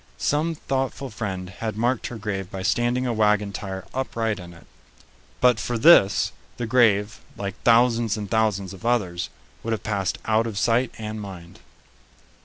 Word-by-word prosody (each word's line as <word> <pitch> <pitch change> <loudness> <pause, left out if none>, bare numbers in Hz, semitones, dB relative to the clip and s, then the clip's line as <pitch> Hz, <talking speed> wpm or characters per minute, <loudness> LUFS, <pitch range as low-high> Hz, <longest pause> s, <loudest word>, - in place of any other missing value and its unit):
Some 160 +3 0
thoughtful 135 -2 -3
friend 95 -4 -4
had 110 +3 -5
marked 120 +2 0
her 120 - -7
grave 95 -3 -4
by 95 -1 -6
standing 120 +4 +1
a 120 - 0
wagon 105 -2 +2
tire 95 -1 -5
upright 115 -5 -2
in 90 -1 -10
it. 85 - -16 0.7
But 125 -3 +4
for 120 +3 -2
this, 115 -7 +6 0.3
the 120 - -2
grave, 110 -3 +3 0.2
like 100 -1 -3
thousands 115 -2 +3
and 105 -1 -4
thousands 100 -3 0
of 95 - -12
others, 100 -8 0 0.3
would 115 - -2
have 110 - -4
passed 100 -3 -1
out 110 +1 +2
of 110 -3 -5
sight 120 +3 +2
and 110 0 -5
mind. 90 -4 -10
110 Hz, 165 wpm, -24 LUFS, 100-120 Hz, 0.7 s, this